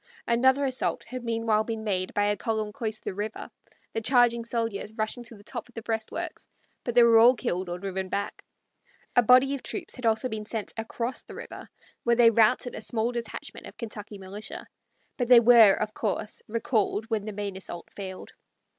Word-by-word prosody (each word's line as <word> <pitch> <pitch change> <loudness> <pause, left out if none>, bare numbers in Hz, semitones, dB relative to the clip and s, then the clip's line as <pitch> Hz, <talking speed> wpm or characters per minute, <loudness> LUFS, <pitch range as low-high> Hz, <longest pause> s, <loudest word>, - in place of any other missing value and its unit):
Another 260 +4 +3
assault 260 -1 0
had 255 -1 -7
meanwhile 225 -2 +1
been 225 0 -4
made 185 -3 -2
by 205 - +3
a 205 0 +2
column 215 -1 -2
close 220 -2 -3
to - - -20
the - - -3
river, 210 +3 -5 0.4
the 225 - -1
charging 240 -1 +3
soldiers 230 -3 -2
rushing 220 +3 -2
to 230 - -9
the 205 - -16
top 240 +2 -7
of 245 - -22
the 230 - -6
breastworks; 220 -1 -4 0.3
but 240 - -3
they 240 - +8
were 230 -1 +7
all 240 +3 +7
killed 185 -4 -2
or 175 - -3
driven 190 0 -4
back. 200 +1 -3 0.7
A 245 - +7
body 255 +4 +5
of 275 - -4
troops 345 -4 -3
had 250 -2 -2
also 225 +3 +2
been 215 -3 -5
sent 220 -2 -4
across 230 +2 -3
the - - -12
river, - - -9 0.3
where 235 0 +3
they 230 -1 +6
routed 230 +3 +3
a - - -6
small 225 +1 -1
detachment 235 -2 -6
of - - -13
Kentucky 210 -2 -7
militia; 195 +3 -8 0.5
but 245 - 0
they 245 -1 +9
were, 230 -4 +7
of 215 0 -3
course, 210 0 -3
recalled 220 -1 0
when 215 -2 0
the 215 - -4
main 200 -1 -4
assault 175 -2 -7
failed. 190 -2 -7
225 Hz, 200 wpm, -27 LUFS, 210-240 Hz, 0.7 s, they